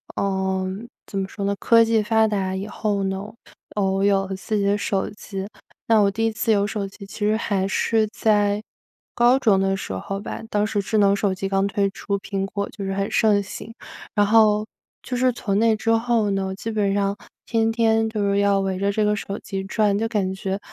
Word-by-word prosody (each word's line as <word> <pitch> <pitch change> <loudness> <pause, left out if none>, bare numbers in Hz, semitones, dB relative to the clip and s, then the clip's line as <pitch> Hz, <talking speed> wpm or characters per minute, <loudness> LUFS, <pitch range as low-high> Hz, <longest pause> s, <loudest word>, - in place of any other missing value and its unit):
呃， 190 -1 -1 0.4
怎 195 - -4
么 190 - -2
说 200 - -6
呢。 200 0 +1
科 230 0 +5
技 225 -1 +2
发 220 +1 +3
达 195 -3 -1
以 195 +2 -3
后 205 -2 -1
呢， 190 0 -2 0.5
呃， 205 - +1
我 195 0 +1
有 195 -1 +3
了 195 - -4
自 195 +3 -3
己 200 - 0
的 200 +1 +2
手 195 -1 -1
机， 195 -2 -7 0.4
那 225 -1 +5
我 200 -1 +4
第 225 +3 -1
1 225 - +1
次 220 +1 +1
有 200 -1 +2
手 205 -1 -3
机 200 +1 -11
其 195 - -11
实 210 +1 +2
还 195 -3 0
是 220 +2 +1
在 205 -1 +2 0.5
高 240 +2 +4
中 215 -7 +3
的 195 0 +1
时 190 - -6
候 195 - -4
吧， - - -6
当 210 0 +1
时 210 -1 -1
智 215 +3 -1
能 200 -1 +5
手 200 -1 +1
机 195 +1 -3
刚 195 0 +1
推 200 0 0
出， 200 +1 -3
苹 195 -1 -3
果 200 +1 -4
就 200 -4 -7
是 195 - -2
很 195 +1 -2
盛 210 -3 +3
行。 225 +3 -8 0.4
然 205 - +4
后 215 0 +4 0.4
就 250 - -3
是 255 -1 +2
从 200 -4 -1
那 225 0 +4
之 220 - -3
后 225 -2 +2
呢， 190 -1 -1
基 225 +3 -5
本 205 -2 +1
上 200 0 0 0.3
天 225 -1 +1
天 225 -1 +2
就 220 -1 -3
是 200 0 +1
要 200 -1 +3
围 190 -1 -1
着 200 +1 0
这 215 +1 0
个 210 0 +2
手 200 -1 -5
机 195 -1 -5
转， 205 +1 +1
就 225 - 0
感 205 -4 -1
觉， 190 +1 -3
200 Hz, 235 characters per minute, -23 LUFS, 195-220 Hz, 0.5 s, 科